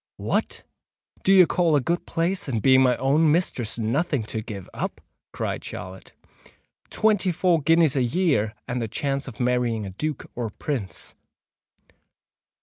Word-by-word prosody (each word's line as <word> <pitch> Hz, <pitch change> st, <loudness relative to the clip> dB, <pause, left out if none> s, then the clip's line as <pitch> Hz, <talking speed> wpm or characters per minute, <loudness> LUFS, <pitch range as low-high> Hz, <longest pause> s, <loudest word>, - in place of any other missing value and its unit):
"What! -, -, -2 dB, 0.6 s
do 195 Hz, -, +2 dB
you 190 Hz, -2 st, +8 dB
call 165 Hz, -2 st, +2 dB
a -, -, +4 dB
good 170 Hz, +6 st, -2 dB
place 180 Hz, +3 st, -1 dB
and 120 Hz, -5 st, -1 dB
being 130 Hz, +4 st, +5 dB
my 125 Hz, -1 st, +3 dB
own 150 Hz, +4 st, +3 dB
mistress, 130 Hz, -, -1 dB
nothing 130 Hz, +4 st, 0 dB
to 110 Hz, +1 st, -4 dB
give 100 Hz, -4 st, -8 dB
up?" -, -, -4 dB, 0.3 s
cried -, -, -4 dB
Charlotte. 95 Hz, +1 st, -9 dB, 0.8 s
"Twenty 210 Hz, -4 st, +2 dB
four 170 Hz, -1 st, +2 dB
guineas 160 Hz, -1 st, +3 dB
a 135 Hz, -, +2 dB
year, 125 Hz, -, +1 dB
and 125 Hz, 0 st, -2 dB
the 115 Hz, -, -2 dB
chance 135 Hz, +5 st, -2 dB
of 120 Hz, -6 st, -9 dB
marrying 120 Hz, -3 st, 0 dB
a 95 Hz, -, -6 dB
Duke 150 Hz, +9 st, -4 dB
or 120 Hz, -1 st, -3 dB
a -, -, -9 dB
Prince!" 120 Hz, -5 st, -5 dB
135 Hz, 155 wpm, -24 LUFS, 115-165 Hz, 0.8 s, you